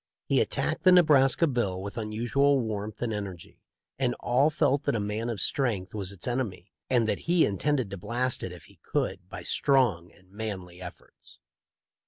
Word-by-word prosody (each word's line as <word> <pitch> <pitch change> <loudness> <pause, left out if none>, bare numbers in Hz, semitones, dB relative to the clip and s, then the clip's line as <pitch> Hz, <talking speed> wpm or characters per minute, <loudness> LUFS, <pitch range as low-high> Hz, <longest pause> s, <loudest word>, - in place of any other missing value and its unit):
He - - +3
attacked - - -1
the 185 - +6
Nebraska 155 -4 +5
bill 120 - -1
with 100 +2 -6
unusual 120 +6 +1
warmth 110 -1 -4
and 115 -2 -1
energy; 100 -5 -7 0.4
and 125 -2 +1
all 130 +5 +3
felt 145 -2 +1
that - - +1
a - - 0
man 105 +3 -2
of 115 -4 -3
strength 105 -9 0
was 100 -3 -4
its 100 +2 -8
enemy, 115 -7 -3 0.2
and 120 -3 +3
that - - 0
he 175 -1 +5
intended 125 +2 0
to 100 - -5
blast 120 +7 -1
it 95 - -4
if 90 -2 -11
he - - -20
could - - -2
by - - -7
strong 120 -12 +2
and 95 -2 -24
manly 95 -4 -6
efforts. 90 -1 -12
115 Hz, 180 wpm, -28 LUFS, 100-130 Hz, 0.4 s, the